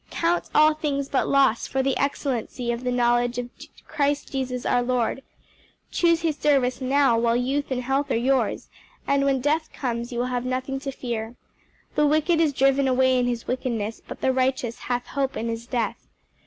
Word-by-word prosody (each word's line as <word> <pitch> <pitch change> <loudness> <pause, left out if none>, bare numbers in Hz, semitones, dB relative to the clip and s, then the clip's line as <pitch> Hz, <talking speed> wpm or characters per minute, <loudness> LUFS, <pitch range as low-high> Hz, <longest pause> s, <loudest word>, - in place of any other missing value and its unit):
'Count 340 +1 0
all 305 0 +6
things 285 -3 -2
but 270 - +1
loss 270 -5 +3
for 265 0 -1
the 270 0 +1
excellency 255 -3 -2
of 235 +1 -4
the 250 - 0
knowledge 240 0 +2
of 245 0 -4 0.4
Christ 285 0 -1
Jesus 255 -2 -3
our 245 - +2
Lord.' 245 +1 0 0.7
Choose 335 -1 +2
his 320 -3 0
service 270 -3 +2
now 265 -2 +3
while 235 0 +2
youth 270 +4 -1
and 255 -1 -2
health 270 +3 0
are - - +1
yours, 250 -1 0 0.4
and 280 0 +2
when 270 -2 +1
death 310 +3 0
comes 240 -2 -3
you 240 - -4
will 245 - 0
have 245 -1 -1
nothing 260 +1 -2
to 275 0 -4
fear. 235 -3 -5 0.6
'The 300 -1 +3
wicked 310 +3 +2
is 315 -3 +3
driven 275 0 +2
away 260 0 +3
in 245 - +1
his 240 -1 -2
wickedness: 230 -4 -3
but - - -8
the 260 - +2
righteous 255 -2 0
hath 245 0 -2
hope 275 -1 -2
in 230 - -2
his 230 +1 -5
death.' 240 -3 -3
260 Hz, 190 wpm, -24 LUFS, 245-280 Hz, 0.7 s, all